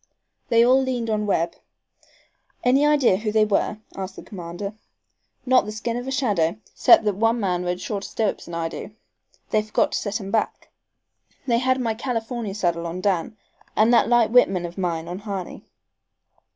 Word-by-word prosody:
They 230 -1 +5
all 260 +2 +5
leaned 245 -4 -2
on 210 -1 -1
Webb. 170 -3 0 1.1
"Any 260 +3 +4
idea 280 -10 +4
who 215 +1 -2
they 215 0 +4
were?" 210 0 0 0.2
asked 190 0 -6
the - - -10
commander. 185 +2 -7 0.7
"Not 255 -3 +4
the 210 - -5
skin 225 +2 -3
of 245 +1 -4
a - - -2
shadow, 205 - +1 0.2
'cept - - +6
that 210 -1 +1
one 225 +2 +2
man 180 -4 -1
rode 180 0 -2
shorter 200 +1 -4
stirrups'n 205 -6 -3
I 165 -1 -1
do. 205 +5 -8 0.6
They 215 - +3
forgot 215 0 0
to - - -1
set 210 +2 -3
'em 195 -2 -7
back. 220 -2 -1 0.8
They 235 -3 +2
had 260 +1 +1
my 230 -3 0
California 230 -3 -3
saddle 170 -4 -1
on 170 +2 -5
Dan 190 +2 -1 0.4
and 220 +3 +4
that 235 - +4
light 240 -2 +4
Whitman 195 -7 +4
of 170 0 -7
mine 170 -4 -2
on 175 +2 -5
Harney." 200 -4 -6
215 Hz, 180 wpm, -23 LUFS, 185-235 Hz, 1.1 s, cept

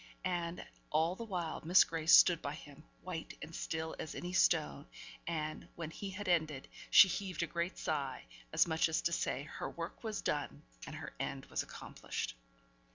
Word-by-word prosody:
And, 175 -1 -2 0.2
all 160 +3 +2
the 230 - -6
while, 180 -6 -3
Miss 175 +4 +7
Grace 165 0 +6
stood 175 - +6
by 145 +1 -3
him, 145 -1 -12 0.2
white 175 -3 -6
and 160 +2 -8
still 160 0 -3
as 160 - -5
any 180 +1 -4
stone; 75 - +3 0.4
and, 155 -2 -3
when 165 -2 -5
he 200 +4 -5
had 200 +1 -6
ended, 155 -6 +1 0.2
she - - +10
heaved 185 -3 -2
a - - +1
great 170 +2 -2
sigh, 140 - -2 0.3
as - - +5
much 160 0 +2
as 160 - 0
to 170 - +2
say 140 -4 -1
her 155 - -5
work 170 +6 -6
was 220 -2 -3
done, 145 0 -2 0.2
and - - -6
her 155 -2 -7
end 135 -1 -3
was - - 0
accomplished. - - -5
165 Hz, 180 wpm, -35 LUFS, 155-175 Hz, 0.4 s, she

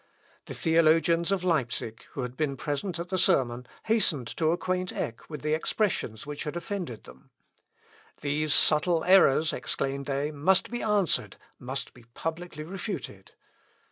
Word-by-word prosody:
The - - -5
theologians 165 +2 +3
of 195 -2 0
Leipsic, 125 -9 -1
who 135 - -3
had 125 0 -5
been 140 -2 -1
present 150 +7 -3
at 170 +1 -5
the 185 -1 0
sermon, 125 -9 +2 0.2
hastened 190 - +2
to 160 -1 +2
acquaint 185 +2 -1
Eck 115 - -5
with 150 -3 -7
the 150 0 +1
expressions 160 - -1
which 150 0 -5
had 150 - -5
offended 175 - -5
them. 65 +1 -16 0.9
"These 150 +1 0
subtile 160 +3 +4
errors," 160 -4 +5
exclaimed 135 +1 -2
they, 140 +2 -1
"must 165 +9 +2
be 240 - -3
answered, 205 -6 +1 0.2
must 135 +2 -4
be 120 -2 -17
publicly 165 -1 -5
refuted." 175 - -6
155 Hz, 145 wpm, -28 LUFS, 135-180 Hz, 0.9 s, errors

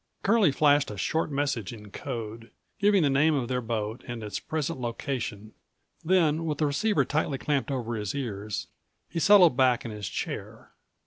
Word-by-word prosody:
Curlie 205 -5 +4
flashed 145 0 +3
a 105 - -7
short 160 +12 0
message 140 -7 -1
in 105 -3 -11
code, 115 -3 -6 0.3
giving 200 -3 +4
the 145 - +3
name 150 +3 +3
of 130 -4 -1
their 125 -1 0
boat 110 0 -3
and 120 -2 -5
its 105 - -4
present 155 -2 -3
location, 115 -3 -4 0.5
then, 165 -2 +2
with 150 -3 -1
the 155 - +1
receiver 200 +10 +1
tightly 150 -2 -1
clamped 145 0 -1
over 120 -4 -2
his 105 +2 -3
ears, 105 -6 -4 0.4
he 165 - -4
settled 180 -5 +6
back 125 -1 +3
in 115 - -4
his 105 -3 -5
chair. - - -6
135 Hz, 175 wpm, -27 LUFS, 115-155 Hz, 0.5 s, settled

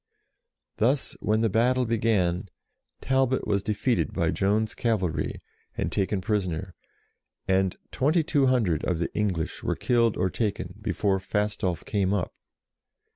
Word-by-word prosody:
Thus, 130 +5 +1
when 110 +1 +1
the 115 - +3
battle 125 +4 +3
began, 100 -5 +1 0.5
Talbot 130 -1 +1
was 100 -2 +1
defeated 105 - 0
by - - +1
Joan's 105 +3 +1
cavalry, 105 -8 -1 0.4
and - - -1
taken 100 0 0
prisoner, 95 -4 -2 0.7
and 95 -1 +2
2200 135 - +2
of 90 - 0
the 85 - -3
English 95 -7 -1
were - - -1
killed 115 -3 +2
or 95 - +1
taken 100 -5 -2
before 100 -1 0
Fastolf 95 -3 -1
came 100 -1 +1
up. 95 - -2
105 Hz, 125 wpm, -26 LUFS, 95-115 Hz, 0.7 s, the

